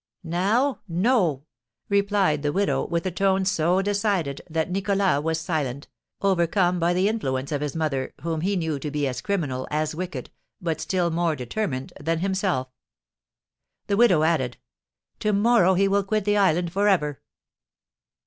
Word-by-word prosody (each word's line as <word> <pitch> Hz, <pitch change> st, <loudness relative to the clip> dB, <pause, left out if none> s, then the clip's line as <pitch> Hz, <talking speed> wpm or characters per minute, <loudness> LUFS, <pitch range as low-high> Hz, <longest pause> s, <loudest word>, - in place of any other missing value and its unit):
"Now? 205 Hz, +11 st, +1 dB
No!" 175 Hz, -, +1 dB, 0.4 s
replied 200 Hz, -6 st, +2 dB
the 145 Hz, 0 st, 0 dB
widow, 200 Hz, +5 st, 0 dB
with 170 Hz, 0 st, -2 dB
a 185 Hz, -, 0 dB
tone 190 Hz, +1 st, +1 dB
so 185 Hz, 0 st, +2 dB
decided 200 Hz, -8 st, 0 dB
that 160 Hz, +2 st, -1 dB
Nicholas 195 Hz, -4 st, +1 dB
was 160 Hz, +1 st, -1 dB
silent, 145 Hz, -6 st, -3 dB, 0.3 s
overcome 180 Hz, -1 st, +2 dB
by 170 Hz, +1 st, +2 dB
the 185 Hz, +2 st, +2 dB
influence 135 Hz, -12 st, -2 dB
of 145 Hz, -1 st, -1 dB
his 150 Hz, 0 st, -3 dB
mother, 150 Hz, -5 st, -1 dB
whom 165 Hz, -1 st, -2 dB
he 195 Hz, +4 st, 0 dB
knew 160 Hz, -5 st, -1 dB
to 150 Hz, -, -4 dB
be 145 Hz, -1 st, -1 dB
as 125 Hz, -, -4 dB
criminal, 145 Hz, -11 st, -2 dB
as 155 Hz, +1 st, -1 dB
wicked, 180 Hz, +3 st, -5 dB, 0.3 s
but 165 Hz, -3 st, -2 dB
still 180 Hz, -3 st, 0 dB
more 165 Hz, -1 st, +1 dB
determined 130 Hz, -, -3 dB
than 165 Hz, +3 st, -1 dB
himself. 190 Hz, -7 st, 0 dB, 1.2 s
The 200 Hz, -, 0 dB
widow 190 Hz, -10 st, +5 dB
added, 155 Hz, -7 st, +1 dB, 0.6 s
"To 210 Hz, 0 st, 0 dB
morrow 200 Hz, -3 st, +4 dB
he 195 Hz, +2 st, +3 dB
will 200 Hz, 0 st, +2 dB
quit 215 Hz, 0 st, -1 dB
the 205 Hz, 0 st, +2 dB
island 175 Hz, -3 st, +2 dB
for 200 Hz, +2 st, +2 dB
ever." 150 Hz, -8 st, +1 dB
175 Hz, 160 wpm, -24 LUFS, 155-195 Hz, 1.2 s, widow